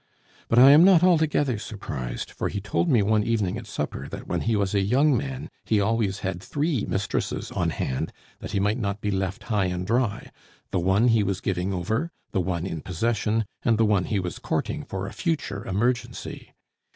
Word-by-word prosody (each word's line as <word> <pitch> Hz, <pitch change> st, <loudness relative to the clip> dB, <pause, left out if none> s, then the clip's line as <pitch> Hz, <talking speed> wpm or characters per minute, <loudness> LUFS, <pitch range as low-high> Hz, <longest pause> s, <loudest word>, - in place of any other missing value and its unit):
"But 115 Hz, -, +2 dB
I 130 Hz, +3 st, +9 dB
am 150 Hz, +4 st, +8 dB
not 180 Hz, -2 st, +6 dB
altogether 150 Hz, -, +3 dB
surprised, 65 Hz, -, -5 dB
for -, -, -3 dB
he -, -, -3 dB
told 105 Hz, -, 0 dB
me 120 Hz, -8 st, +4 dB
one 105 Hz, +1 st, +2 dB
evening 105 Hz, -4 st, 0 dB
at 115 Hz, -, -10 dB
supper 75 Hz, -8 st, -4 dB
that -, -, -7 dB
when -, -, -2 dB
he 115 Hz, -1 st, +1 dB
was 100 Hz, -1 st, 0 dB
a 100 Hz, -, +3 dB
young 130 Hz, +8 st, +3 dB
man 135 Hz, +2 st, -3 dB, 0.2 s
he 110 Hz, -, +2 dB
always 100 Hz, -1 st, 0 dB
had 95 Hz, -2 st, -3 dB
three 145 Hz, -, -1 dB
mistresses 100 Hz, +1 st, -2 dB
on -, -, 0 dB
hand 65 Hz, -, -2 dB, 0.3 s
that -, -, -7 dB
he 100 Hz, -, 0 dB
might 105 Hz, +5 st, +1 dB
not 100 Hz, -2 st, -2 dB
be 105 Hz, 0 st, -2 dB
left 95 Hz, 0 st, -2 dB
high 105 Hz, -4 st, 0 dB
and 90 Hz, 0 st, -2 dB
dry 115 Hz, 0 st, 0 dB, 0.4 s
the -, -, +1 dB
one 95 Hz, +7 st, +3 dB
he 115 Hz, -2 st, +4 dB
was 100 Hz, -2 st, -1 dB
giving 95 Hz, 0 st, -1 dB
over, 110 Hz, -, -1 dB, 0.2 s
the 95 Hz, -, +1 dB
one 85 Hz, -1 st, -2 dB
in 85 Hz, -5 st, -4 dB
possession, 110 Hz, +4 st, 0 dB, 0.2 s
and 115 Hz, -2 st, +2 dB
the 115 Hz, -, +4 dB
one 100 Hz, -4 st, +2 dB
he 105 Hz, -, 0 dB
was 90 Hz, -3 st, -4 dB
courting -, -, -2 dB
for 95 Hz, 0 st, -4 dB
a -, -, -7 dB
future 145 Hz, -, -2 dB
emergency. 120 Hz, +6 st, -2 dB
105 Hz, 200 wpm, -25 LUFS, 95-120 Hz, 0.4 s, I